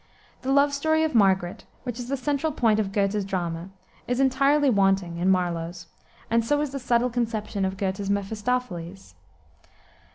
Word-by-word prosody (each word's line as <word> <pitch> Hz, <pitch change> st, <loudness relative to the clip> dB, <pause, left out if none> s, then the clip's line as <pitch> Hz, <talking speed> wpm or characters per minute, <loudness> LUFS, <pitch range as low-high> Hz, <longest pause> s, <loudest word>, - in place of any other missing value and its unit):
The 265 Hz, -, -2 dB
love 280 Hz, +1 st, +4 dB
story 315 Hz, +3 st, +2 dB
of 315 Hz, -, 0 dB
Margaret, 190 Hz, -5 st, +2 dB, 0.2 s
which 245 Hz, -2 st, -5 dB
is 245 Hz, -, -5 dB
the 275 Hz, -, 0 dB
central 290 Hz, +3 st, -1 dB
point 225 Hz, -6 st, +2 dB
of 200 Hz, -2 st, -1 dB
Goethe's 200 Hz, 0 st, 0 dB
drama, 175 Hz, -2 st, -3 dB, 0.4 s
is 245 Hz, +1 st, -1 dB
entirely 275 Hz, +2 st, +3 dB
wanting 195 Hz, -6 st, +2 dB
in 180 Hz, +2 st, +2 dB
Marlowe's, 175 Hz, -1 st, -1 dB, 0.4 s
and 230 Hz, 0 st, +2 dB
so 290 Hz, +6 st, +1 dB
is 295 Hz, -3 st, -2 dB
the 275 Hz, -, -4 dB
subtle 245 Hz, 0 st, +1 dB
conception 220 Hz, -4 st, -2 dB
of 190 Hz, 0 st, -3 dB
Goethe's 195 Hz, 0 st, -2 dB
Mephistophiles. 200 Hz, -, -3 dB
215 Hz, 160 wpm, -25 LUFS, 190-260 Hz, 0.4 s, love